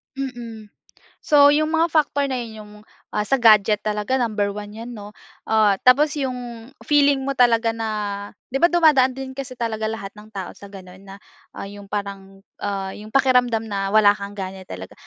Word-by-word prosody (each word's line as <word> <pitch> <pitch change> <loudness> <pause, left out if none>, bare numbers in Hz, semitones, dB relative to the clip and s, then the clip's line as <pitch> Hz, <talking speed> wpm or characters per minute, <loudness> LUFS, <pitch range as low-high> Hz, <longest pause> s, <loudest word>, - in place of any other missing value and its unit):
Mm. 235 -5 -7 0.5
So 285 -1 +6
'yung 310 +2 +2
mga 330 +1 +2
factor 285 -3 +1
na 260 - -2
'yun 230 -3 -6
'yung, 210 0 -13 0.4
ah, 210 - -1
sa 270 +2 0
gadget 215 -2 +5
talaga, 215 +5 -1
number 210 -3 -1
1 205 0 -8
yan 235 +2 -8
'no? 210 -2 -10 0.4
Ah, 215 -3 +3
tapos 280 +4 +4
'yung, 245 -4 -5 0.2
feeling 285 -2 +3
mo 275 - -1
talaga 230 -3 +3
na 225 -1 -4 0.6
'di 270 - -1
ba, 345 - +6
dumadaan 295 -7 +4
din 265 -1 -6
kasi 260 -2 -7
talaga 220 -2 -2
lahat 215 -3 -6
ng 210 +1 -13
tao 190 -3 -6
sa 200 - -13
ganun? 185 -2 -13
Na, 195 - -10 0.4
ah, - - -6
'yung 200 0 -11
parang, 195 -1 -6 0.2
ah, 195 -1 -3
'yung 210 +1 -10
pakiramdam 250 -4 +3
na, 195 -2 -3
wala 205 0 +5
kang 200 0 -8
gana 190 -1 -6
talaga. 90 0 -8
225 Hz, 185 wpm, -22 LUFS, 205-265 Hz, 0.6 s, So